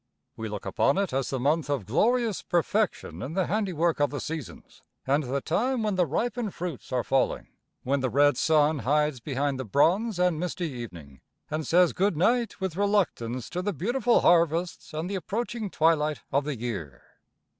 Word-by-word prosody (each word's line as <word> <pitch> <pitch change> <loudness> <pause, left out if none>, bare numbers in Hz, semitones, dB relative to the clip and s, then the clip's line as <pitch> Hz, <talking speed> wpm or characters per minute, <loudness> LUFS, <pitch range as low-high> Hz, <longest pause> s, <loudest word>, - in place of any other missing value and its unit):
We 110 -1 -5
look 105 -1 -6
upon 100 - +2
it 195 -7 0
as 135 0 -1
the 135 - -2
month 145 +4 +1
of 140 -8 -1
glorious 230 - +1
perfection 195 +4 -1
in 145 - -5
the 190 -2 +2
handiwork 175 -5 0
of 145 -1 +3
the 145 - -4
seasons 150 - -7 0.2
and 140 +2 +1
the 135 +2 -2
time 235 - 0
when 210 -1 0
the 180 -2 +2
ripened 230 - -2
fruits 170 -6 -6
are 125 -2 0
falling; 135 +2 0 0.3
when 140 +2 +1
the 130 -1 0
red 145 +3 +4
sun 155 +1 +3
hides 150 +2 +1
behind 140 +1 -2
the - - -2
bronze 175 - +2
and 180 -3 +2
misty 175 -2 -3
evening, 85 - -9 0.3
and 155 0 -2
says 180 +1 +4
good 190 -3 +1
night 235 +7 +1
with 190 -4 -3
reluctance 180 - 0
to 180 - -2
the 205 +2 -2
beautiful 235 - +2
harvests 170 0 +2
and 155 +3 -3
the 200 - -4
approaching 215 +4 -3
twilight 155 -3 +2
of 140 +1 +1
the 150 -3 -3
year. 95 - -5
160 Hz, 180 wpm, -27 LUFS, 135-190 Hz, 0.3 s, red